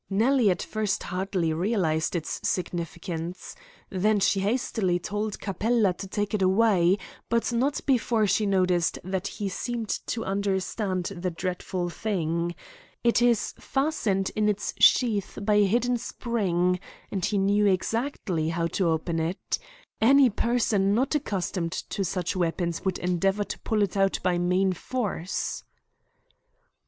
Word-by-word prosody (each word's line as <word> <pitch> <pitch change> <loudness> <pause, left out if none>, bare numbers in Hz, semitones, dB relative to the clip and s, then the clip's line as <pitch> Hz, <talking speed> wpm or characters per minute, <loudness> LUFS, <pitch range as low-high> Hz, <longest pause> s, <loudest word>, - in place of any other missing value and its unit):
Nellie 225 +3 +3
at 180 - 0
first 215 -2 -2
hardly 185 -3 -1
realised 170 -3 0
its 165 -3 -3
significance. 175 0 -3 0.4
Then 210 +2 +2
she 195 0 +2
hastily 200 -3 0
told 205 +3 -3
Capella 210 +1 +1
to 195 +2 -8
take 205 +2 -2
it 210 - 0
away, 190 -2 +4 0.3
but 235 +1 +1
not 270 +5 +1
before 235 -4 +2
she 205 +2 +2
noticed 185 -3 +2
that 190 +1 -2
he 205 -1 -4
seemed 230 +3 -3 0.2
to 225 -1 -2
understand 195 -1 -1
the 180 +1 -2
dreadful 180 0 -3
thing. 170 -4 -1 0.5
It 235 0 +3
is 240 -2 +2
fastened 230 -10 0
in 210 0 +2
its 210 0 -2
sheath 220 -6 +4
by 205 +1 +1
a 205 - +5
hidden 245 +4 +1
spring, 180 -7 0 0.3
and 190 -3 -2
he 205 - +1
knew 205 +1 +3
exactly 190 - 0
how 165 0 -1 0.2
to 180 - +3
open 165 +1 -1
it. 165 +3 -2 0.4
Any 265 +2 +6
person 210 -3 +1
not 260 +6 +1
accustomed 190 - -2
to 200 - -3
such 180 0 -2
weapons 170 -1 -1
would 190 -2 0
endeavour 190 +3 +1
to - - -6
pull 215 -2 +1
it 200 - -2
out 195 0 +2
by 180 -1 +2
main 185 +2 +2
force." 195 -4 -3
195 Hz, 140 wpm, -26 LUFS, 180-220 Hz, 0.5 s, Any